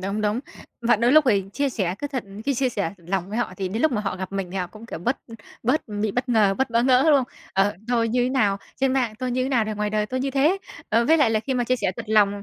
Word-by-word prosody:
đúng, 200 +3 -2
đúng. 210 +3 0 0.4
Và 235 0 +3
đôi 235 +4 +3
lúc 310 -1 +7
thì 200 -4 +3
chia 280 +6 0
sẻ 190 -8 -1
cứ 290 - -3
thật 265 -6 -4 0.2
cứ 280 - +1
chia 260 +1 +1
sẻ 200 -7 -2
thật 170 - -21
lòng 190 -1 -1
với 215 +3 -3
họ 240 - -1
thì 190 -1 -2
đến 220 +5 -3
lúc 315 - +3
mà 210 - 0
họ 195 -3 -3
gặp 190 +1 -6
mình 195 -2 -3
thì 195 - -6
họ 180 -1 -1
cũng, 220 +5 -13
kiểu, 165 - -6
bớt 245 +10 0 0.5
bớt 255 +7 +2 0.2
bị 215 -1 +1
bất 250 +1 -2
ngờ, 210 -5 +3
bớt 265 +2 -1
bỡ 230 0 +2
ngỡ, 255 0 +5
đúng - - +6
không? 255 -2 -2 0.2
Ờ, 195 +2 +2
tôi 230 -2 +2
như 245 +2 +1
nào 205 -7 +2 0.2
trên 265 -1 +1
mạng 245 -5 0
tôi 255 -1 -2
thế 255 +1 0
nào 245 -5 +2
thì 215 - -3
ngoài 210 0 -2
đời 210 0 0
tôi 255 +3 -3
như 270 +1 -1
thế. 295 +8 +2 0.3
Ờ, 230 +2 +3
với 320 +4 +5
lại 285 -7 +4
là 220 - +1
khi 265 +3 -3
mà 245 - +1
chia 255 +2 +1
sẻ 190 -6 -1
thật 230 - -5
lòng, 205 -2 +3
230 Hz, 305 wpm, -24 LUFS, 205-255 Hz, 0.5 s, lúc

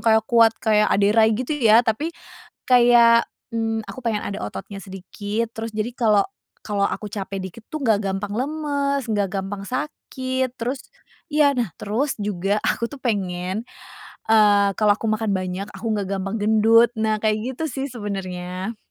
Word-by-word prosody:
kayak 220 -1 +3
kuat 230 -1 +4
kayak 210 -1 +2
Ade 200 +1 +3
Rai 220 -1 +4
gitu 255 +5 -3
ya, 225 +1 +6
tapi 235 +8 0 0.6
kayak, 240 -2 +6 0.2
mmm, 225 -1 0
aku 195 +6 -8
pengen 220 -3 -1
ada 200 - -5
ototnya 105 - -7
sedikit 205 +4 -5
terus 225 0 -5
jadi 215 +2 -2
kalau 215 -5 +3 0.3
kalau 205 -2 -2
aku 210 - -2
capek 200 -2 -5
dikit 190 +4 -8
tuh 310 - -3
nggak 220 -6 +2
gampang 200 +1 -3
lemes, 280 -1 -1
nggak 205 -4 0
gampang 195 0 -4
sakit, 260 +1 -3
terus 250 +3 -3 0.5
iya. 290 -2 +4
Nah 235 -7 -1
terus 235 +6 -2
juga 200 0 -1
aku - - 0
tuh 280 - -9
pengen, 190 -3 -2 0.7
eee, 205 -2 +5
kalau 210 -1 +4
aku 220 +2 -3
makan 215 -1 0
banyak, 185 +1 -3
aku - - -11
nggak 210 -2 -1
gampang 195 +2 -3
gendut. 220 +2 +4
Nah 220 -1 0
kayak 215 0 +1 0.2
gitu - - -3
sih 270 -2 -3
sebenernya. 190 -2 -5
215 Hz, 160 wpm, -22 LUFS, 200-235 Hz, 0.7 s, ya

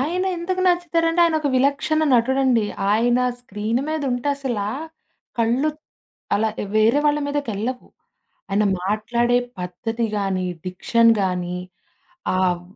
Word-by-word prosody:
ఆయన 350 +7 0
ఎందుకు 370 +2 -2
నచ్చుతారంటే 340 -1 +2
ఆయన 325 -2 +2
ఒక 290 - 0
విలక్షణ 285 +4 +2
నటుడండి. 255 -1 +3 0.3
ఆయన 240 +3 +3 0.2
స్క్రీన్ 220 +2 -2
మీద 310 -1 -2
ఉంటే 245 +3 -2
అసల, 255 -7 -3 0.8
కళ్ళు 240 +6 +2 0.7
అలా 220 +2 +2 0.3
వేరే 225 +6 +4
వాళ్ళ 295 0 +3
మీదకెళ్ళవు. 250 -4 -3 0.6
ఆయన 205 +2 +2 0.2
మాట్లాడే 235 +5 +1 0.2
పద్ధతి 225 +6 -3
గానీ, 190 -2 -1 0.2
డిక్షన్ 230 +5 +3
గానీ 180 -1 -1 0.8
ఆహ్, 180 -2 +1
240 Hz, 115 wpm, -22 LUFS, 210-290 Hz, 0.8 s, వేరే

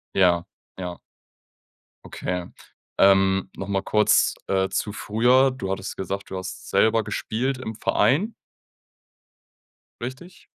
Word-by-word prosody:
Ja. 90 -2 +4 0.3
Ja. 90 -2 -6 1.1
Okay. 90 -1 -4 0.5
Ähm, 95 -1 +4
noch 95 - -5
mal 100 -1 0
kurz, 105 +2 +3
äh, 95 0 +1
zu 105 - -2
früher. 125 +6 +3
Du 95 -7 -5
hattest 95 0 -4
gesagt, 100 +1 -4
du 95 - -5
hast 95 0 -7
selber 110 0 +3
gespielt 120 +5 -2
im 110 -3 -6
Verein 140 - +2 1.7
richtig? 130 +10 -8
100 Hz, 115 wpm, -24 LUFS, 95-120 Hz, 1.7 s, Ja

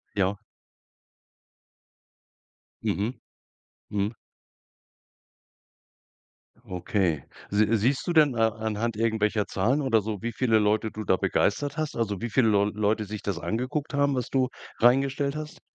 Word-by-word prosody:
Ja. 100 0 +1 2.4
Mhm. 105 +5 -1 0.8
Mhm. 105 +2 -1 2.5
Okay. 90 - -1 0.3
Si 105 +1 +3
siehst 125 +6 +1
du 175 - +1
denn 150 -5 +5
a 115 -1 +3
anhand 110 +1 -2
irgendwelcher 110 -2 +1
Zahlen 120 +10 +1
oder 115 -6 +3
so, 105 -1 -4
wie 120 +1 -3
viele 115 -4 +3
Leute 105 +1 +1
du 110 - -6
da 95 - +3
begeistert 140 +12 0
hast? 155 -1 -2
Also 105 -5 -2
wie 120 - -2
viele 115 0 +3
Leu 100 -1 +4
Leute 110 +1 0
sich 105 +1 -6
das 95 -5 -3
angeguckt 130 - -3
haben, 140 -1 +2
was 125 -2 -2
du 130 -2 +1 0.3
reingestellt 135 +3 +3
hast? 155 0 -7
110 Hz, 130 wpm, -27 LUFS, 105-130 Hz, 2.5 s, denn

